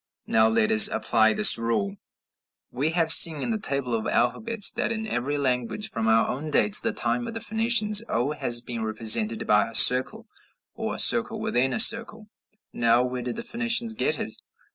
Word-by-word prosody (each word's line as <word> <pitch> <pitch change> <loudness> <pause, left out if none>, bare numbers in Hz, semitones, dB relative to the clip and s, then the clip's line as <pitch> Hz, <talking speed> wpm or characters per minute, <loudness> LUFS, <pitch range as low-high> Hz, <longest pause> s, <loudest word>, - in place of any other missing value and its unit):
Now 110 0 +1
let 110 -1 -1
us 110 -1 +6
apply 110 -1 0
this 105 - +4
rule: 105 -4 -4 0.7
We 135 +5 -3
have 165 -1 0
seen 160 -2 +6
in - - -4
the 220 - -4
table 140 - -4
of 110 -1 -4
alphabets 205 - +1
that - - -4
in 220 -1 -5
every 145 - -4
language, 130 - -4
from 115 -1 -4
our 110 0 +1
own 150 +5 -6
day 150 - 0
to 210 - +5
the 230 - -2
time 240 -1 -3
of 230 - -9
the - - -5
Phoenicians, 220 -1 +1
o 120 +6 -3
has 120 -5 -1
been 120 -1 -8
represented 110 0 -1
by 105 +1 0
a 115 - -9
circle 125 +1 +3 0.5
or - - -6
a - - -9
circle - - +2
within 130 +2 -2
a - - -3
circle. 225 -1 +3 0.4
Now 120 +1 0
where 125 0 -6
did 120 -1 -6
the - - -7
Phoenicians 235 -1 -2
get 440 - -2
it? - - -7
130 Hz, 195 wpm, -23 LUFS, -, 0.7 s, us